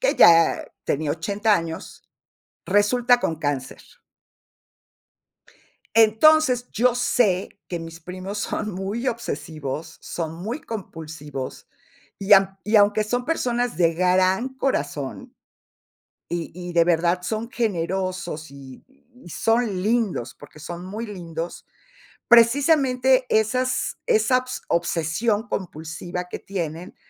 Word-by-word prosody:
que - - +2
ya 165 -1 +6 0.2
tenía 150 +1 -1
80 200 +7 +1
años, 165 -3 -5 0.7
resulta 240 +5 +3
con 165 - -1
cáncer. 145 -4 -3 2.2
Entonces, 250 +3 +5
yo 245 +2 +2
sé 220 -6 +1 0.2
que 175 - -3
mis 165 0 -9
primos 185 +3 -7
son 210 0 -3
muy 200 +7 -3
obsesivos, 155 - -5
son 165 -2 -5
muy 220 - -5
compulsivos, 155 - -7 0.5
y 200 +1 -4
am 195 0 +4
y 215 +2 +1
aunque 205 +1 +4
son 245 +3 -2
personas 245 -6 -1
de 165 -2 +3
gran 185 +6 +2
corazón, 245 - -3 0.9
y 170 -1 -3
y 180 +1 -7
de 170 - +5
verdad 170 +1 +2
son 220 +4 -3
generosos, 185 - -2
y 135 -2 -12 0.4
y - - -10
son 225 0 0
lindos, 210 - 0
porque 145 +1 -15
son 175 +3 -7
muy 215 +5 -5
lindos, 170 -4 -6 0.6
precisamente 260 +1 +4
esas 250 +4 +1
esabs 255 - +1
obsesión 175 +7 0
compulsiva 175 -1 -5
que - - -6
tienen, 170 -2 -5
195 Hz, 110 wpm, -23 LUFS, 165-235 Hz, 2.2 s, ya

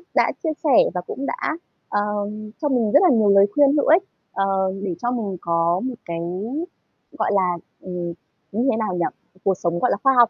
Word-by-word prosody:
đã - - +4
chia 325 - +1
sẻ 290 -6 +5 0.2
và 180 - -2
cũng 265 +9 -6
đã, - - -2 0.5
ờm, 210 +1 -2
cho 295 - +1
mình 240 -6 +1
rất - - +8
là 365 - +6
nhiều 215 -2 +4
lời 200 0 +7
khuyên 285 -1 +5
hữu 290 - +2
ích, 335 +5 +6 0.3
ờ, 195 - +1 0.4
để 185 -4 -2
cho 240 - 0
mình 210 -6 -3
có 170 +1 +1
một 260 -1 -3
cái, 170 -1 -4 1.0
gọi - - +1
là, 180 -3 +2 0.2
ừm, 175 -2 -4 0.4
như 230 +6 0
thế 220 - 0
nào 215 -5 -1
nhỉ? 175 -1 +1 0.4
Cuộc 195 - +3
sống, 175 -1 -1
gọi 250 - +2
là, - - +1
khoa 270 - +5
học 240 -2 +7
210 Hz, 210 wpm, -22 LUFS, 180-250 Hz, 1.0 s, rất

